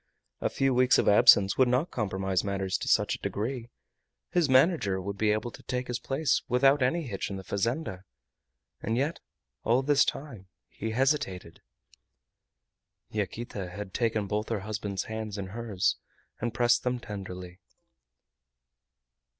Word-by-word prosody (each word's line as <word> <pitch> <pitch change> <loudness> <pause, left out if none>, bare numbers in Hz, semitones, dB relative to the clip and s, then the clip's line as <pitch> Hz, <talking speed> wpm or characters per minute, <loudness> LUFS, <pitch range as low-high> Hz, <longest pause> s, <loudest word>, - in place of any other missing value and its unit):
A - - 0
few 135 -1 +1
weeks 125 0 +4
of - - +1
absence 100 -1 +6
would 130 - +6
not 125 +7 +1
compromise 95 -4 -1
matters 95 -1 -2
to - - -5
such - - +3
a - - -5
degree. 120 +3 -3 0.6
His 170 -5 +2
manager 130 - +3
would 100 +2 -4
be 105 +1 +1
able 110 +3 -1
to - - -13
take 125 -1 -3
his 125 -1 -3
place 135 0 0
without 135 +3 +4
any 150 +7 +1
hitch 100 -9 -4
in 100 - -4
the 95 - -8
fazenda. 100 - -2 0.8
And 115 +2 -1
yet 145 +6 -1 0.4
all 125 +4 +2
this 140 0 +4
time 120 -10 -5 0.2
he 110 - -5
hesitated. 115 - -1 1.5
Yaquita 105 -2 -4
had 95 +1 -7
taken 110 -3 0
both 105 +2 -2
her 110 -4 -1
husband's 100 -1 -3
hands 110 -2 -5
in 95 -2 -5
hers, 105 -3 -1 0.4
and 120 +1 -2
pressed 120 +1 +3
them 125 0 -1
tenderly. 90 -4 -8
110 Hz, 150 wpm, -28 LUFS, 100-130 Hz, 1.5 s, absence